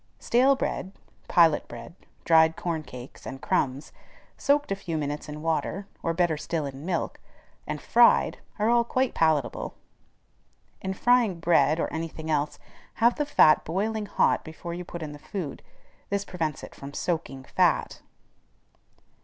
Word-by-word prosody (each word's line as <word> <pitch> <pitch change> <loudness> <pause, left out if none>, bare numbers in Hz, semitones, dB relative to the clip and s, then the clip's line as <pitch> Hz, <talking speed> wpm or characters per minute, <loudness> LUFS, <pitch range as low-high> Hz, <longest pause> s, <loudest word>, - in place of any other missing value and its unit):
Stale 255 - +3
bread, 190 -7 -3 0.3
pilot 165 -4 +4
bread, 120 +6 -9 0.3
dried 160 -1 +5
corn 170 -3 -2
cakes, 125 -3 -11
and 135 0 -6
crumbs, 135 +2 -1 0.4
soaked 290 -4 +1
a - - +2
few 175 -4 -4
minutes 145 0 -4
in 150 +1 -7
water, 165 +4 -1 0.2
or 165 - 0
better 165 -2 +1
still 155 0 -2
in 140 +3 -7
milk, 180 -3 -2 0.5
and - - -3
fried, - - +4 0.2
are 210 0 +1
all 235 0 +4
quite 255 +2 0
palatable. 155 -6 0 1.1
In 190 0 -3
frying 235 -6 +3
bread, 160 -2 +3
or - - +1
any 165 +1 -2
thing 160 0 -6
else, 150 0 0 0.4
have 235 +2 +4
the 295 -1 -2
fat 155 - +5
boiling 210 +5 -2
hot - - +2
before 165 +2 -7
you 175 +1 -5
put 170 -1 -7
in 150 - -5
the 145 - -10
food: 170 -4 -6 0.5
this 200 0 -1
prevents 160 -6 -3
it - - -9
from 140 +1 -10
soaking 160 -6 -3
fat. - - +1
165 Hz, 155 wpm, -27 LUFS, 150-195 Hz, 1.1 s, dried